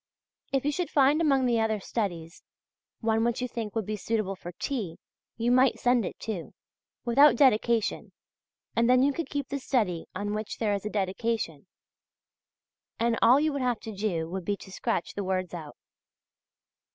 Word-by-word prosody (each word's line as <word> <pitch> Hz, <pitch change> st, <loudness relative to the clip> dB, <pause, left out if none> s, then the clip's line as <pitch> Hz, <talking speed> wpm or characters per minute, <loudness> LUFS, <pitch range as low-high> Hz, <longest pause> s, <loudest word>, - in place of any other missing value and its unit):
If 270 Hz, 0 st, 0 dB
you 295 Hz, -, +2 dB
should 345 Hz, +3 st, -2 dB
find 285 Hz, +3 st, +4 dB
among 275 Hz, -5 st, +3 dB
the 240 Hz, -2 st, +2 dB
other 220 Hz, -1 st, +1 dB
studies, 175 Hz, -6 st, -4 dB, 0.6 s
one 225 Hz, -1 st, +2 dB
which 235 Hz, +1 st, 0 dB
you 250 Hz, -, -1 dB
think 230 Hz, -3 st, -5 dB
would 220 Hz, -3 st, -1 dB
be 215 Hz, -, -2 dB
suitable 210 Hz, -1 st, -2 dB
for 175 Hz, -1 st, -8 dB
T. 205 Hz, -, -3 dB, 0.4 s
you 235 Hz, +1 st, +1 dB
might 255 Hz, 0 st, +4 dB
send 245 Hz, -5 st, +2 dB
it -, -, -8 dB
too, 205 Hz, -7 st, -5 dB, 0.5 s
without 275 Hz, +3 st, +6 dB
dedication, 235 Hz, -3 st, +2 dB, 0.6 s
and 230 Hz, +1 st, +3 dB
then 255 Hz, +1 st, +5 dB
you 285 Hz, +1 st, +3 dB
could 335 Hz, +3 st, -4 dB
keep 285 Hz, -1 st, -3 dB
the 280 Hz, -, -2 dB
study 210 Hz, -11 st, 0 dB
on 205 Hz, +2 st, -2 dB
which 215 Hz, 0 st, -4 dB
there 215 Hz, -3 st, 0 dB
is 200 Hz, +1 st, -2 dB
a -, -, -3 dB
dedication, 195 Hz, -4 st, -2 dB, 1.3 s
and 235 Hz, 0 st, +2 dB
all 245 Hz, +4 st, +7 dB
you 305 Hz, 0 st, +1 dB
would 280 Hz, -, -2 dB
have 245 Hz, -3 st, 0 dB
to 220 Hz, -, -7 dB
do 185 Hz, -6 st, -1 dB
would 185 Hz, +2 st, -5 dB
be 205 Hz, +3 st, -1 dB
to 190 Hz, -, -12 dB
scratch 175 Hz, -, -2 dB
the 200 Hz, -, -3 dB
words 185 Hz, -1 st, -2 dB
out. 160 Hz, -4 st, -8 dB
225 Hz, 180 wpm, -28 LUFS, 195-255 Hz, 1.3 s, all